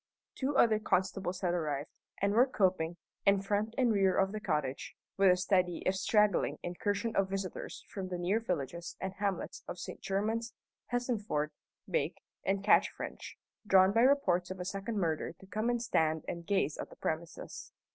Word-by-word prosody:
Two 275 Hz, +1 st, -1 dB
other 220 Hz, -2 st, +5 dB
constables 185 Hz, -2 st, 0 dB
had 175 Hz, -2 st, +1 dB
arrived, 150 Hz, -4 st, -2 dB, 0.3 s
and 200 Hz, +1 st, +2 dB
were 245 Hz, +5 st, +6 dB
coping, 180 Hz, -7 st, +1 dB, 0.3 s
in 200 Hz, 0 st, +5 dB
front 210 Hz, +3 st, -1 dB
and 245 Hz, -4 st, +3 dB
rear 195 Hz, -2 st, +3 dB
of 195 Hz, 0 st, +3 dB
the 215 Hz, -, -4 dB
cottage, 140 Hz, -9 st, -2 dB, 0.2 s
with 195 Hz, -1 st, +5 dB
a 180 Hz, -, +5 dB
steady 180 Hz, -2 st, +1 dB
if 185 Hz, -, +3 dB
straggling 210 Hz, 0 st, +2 dB
incursion 205 Hz, +5 st, -2 dB
of 195 Hz, -1 st, +2 dB
visitors 195 Hz, -1 st, -5 dB
from 190 Hz, -2 st, -5 dB
the 180 Hz, -1 st, -3 dB
near 180 Hz, +5 st, +1 dB
villages 170 Hz, -, -4 dB
and 190 Hz, 0 st, -3 dB
hamlets 200 Hz, -1 st, -3 dB
of -, -, -5 dB
St. -, -, -7 dB
Germans, 220 Hz, +4 st, -1 dB, 0.3 s
Hessenford, 220 Hz, -, -1 dB, 0.4 s
Bake, 485 Hz, -, -1 dB, 0.2 s
and 195 Hz, 0 st, 0 dB
Catchfrench, 210 Hz, -, +1 dB, 0.3 s
drawn 190 Hz, -1 st, +6 dB
by 225 Hz, +3 st, +3 dB
reports 215 Hz, -10 st, +3 dB
of 185 Hz, 0 st, -6 dB
a 180 Hz, -, -4 dB
second 195 Hz, +4 st, -3 dB
murder 165 Hz, -4 st, -1 dB
to 190 Hz, -, -17 dB
come 215 Hz, +4 st, -1 dB
and 240 Hz, 0 st, +1 dB
stand 160 Hz, -8 st, +1 dB
and 170 Hz, -1 st, -5 dB
gaze 190 Hz, -7 st, +1 dB
at -, -, -5 dB
the -, -, -13 dB
premises. 160 Hz, +1 st, -5 dB
195 Hz, 175 wpm, -32 LUFS, 175-215 Hz, 0.4 s, were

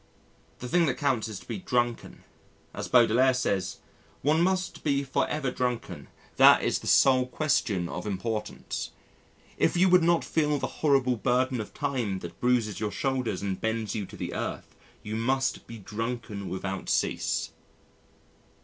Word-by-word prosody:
The 125 Hz, -, -7 dB
thing 170 Hz, +5 st, +3 dB
that 130 Hz, -, -1 dB
counts 130 Hz, -7 st, 0 dB
is 110 Hz, -3 st, -6 dB
to -, -, -17 dB
be 115 Hz, -4 st, -4 dB
drunken; 120 Hz, +3 st, -2 dB, 0.5 s
as -, -, -5 dB
Baudelaire 125 Hz, +2 st, +4 dB
says, 100 Hz, -7 st, -1 dB, 0.5 s
"One 155 Hz, +4 st, +3 dB
must 185 Hz, +1 st, 0 dB
be 140 Hz, -2 st, +1 dB
for 130 Hz, -2 st, 0 dB
ever 145 Hz, -4 st, -2 dB
drunken; 125 Hz, -2 st, -3 dB, 0.3 s
that -, -, +7 dB
is -, -, +1 dB
the -, -, -9 dB
sole 130 Hz, -2 st, +5 dB
question 120 Hz, -, 0 dB
of 105 Hz, -, -5 dB
importance. 105 Hz, +2 st, -4 dB, 0.7 s
If -, -, +2 dB
you 185 Hz, +2 st, +5 dB
would 180 Hz, 0 st, +6 dB
not 170 Hz, 0 st, +2 dB
feel 150 Hz, -2 st, +1 dB
the -, -, -2 dB, 0.2 s
horrible 135 Hz, -5 st, +3 dB
burden 125 Hz, +1 st, +1 dB
of 105 Hz, -, -8 dB
time 125 Hz, -9 st, -1 dB
that 85 Hz, 0 st, -9 dB
bruises 120 Hz, -4 st, +1 dB
your 105 Hz, -1 st, -1 dB
shoulders 130 Hz, -1 st, -2 dB
and 95 Hz, -2 st, -3 dB
bends 110 Hz, -2 st, -1 dB
you 105 Hz, -4 st, -3 dB
to -, -, -12 dB
the -, -, -4 dB
earth, -, -, -5 dB, 0.3 s
you 105 Hz, +1 st, -4 dB
must 130 Hz, +4 st, 0 dB
be 115 Hz, -, -8 dB
drunken 110 Hz, -1 st, -5 dB
without 95 Hz, 0 st, -4 dB
cease." -, -, 0 dB
125 Hz, 160 wpm, -27 LUFS, 110-135 Hz, 0.7 s, that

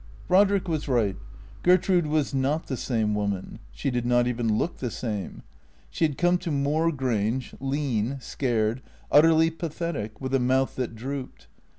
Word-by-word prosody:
Brodrick 195 Hz, 0 st, +4 dB
was 155 Hz, -3 st, -2 dB
right. 115 Hz, -7 st, +1 dB, 0.5 s
Gertrude 180 Hz, -1 st, +3 dB
was 150 Hz, -2 st, 0 dB
not 140 Hz, +4 st, 0 dB
the 135 Hz, -, -3 dB
same 110 Hz, -4 st, 0 dB
woman. 100 Hz, -2 st, -3 dB
She -, -, -2 dB
did 120 Hz, -1 st, -1 dB
not 120 Hz, 0 st, +3 dB
even 115 Hz, -3 st, 0 dB
look 175 Hz, -, -1 dB
the 125 Hz, -, -3 dB
same. 105 Hz, -6 st, -5 dB, 0.5 s
She 165 Hz, -, +1 dB
had 145 Hz, -3 st, -2 dB
come 175 Hz, 0 st, +3 dB
to 175 Hz, -, -4 dB
Moor 150 Hz, +3 st, +1 dB
Grange 125 Hz, -3 st, -1 dB
lean, 135 Hz, -2 st, -1 dB
scared, 120 Hz, -2 st, -1 dB, 0.3 s
utterly 160 Hz, +2 st, +6 dB
pathetic, 160 Hz, -, -4 dB
with 130 Hz, 0 st, -4 dB
a 135 Hz, -, +4 dB
mouth 130 Hz, +2 st, +1 dB
that 125 Hz, -3 st, -3 dB
drooped. 130 Hz, +3 st, -6 dB
135 Hz, 160 wpm, -26 LUFS, 115-155 Hz, 0.5 s, utterly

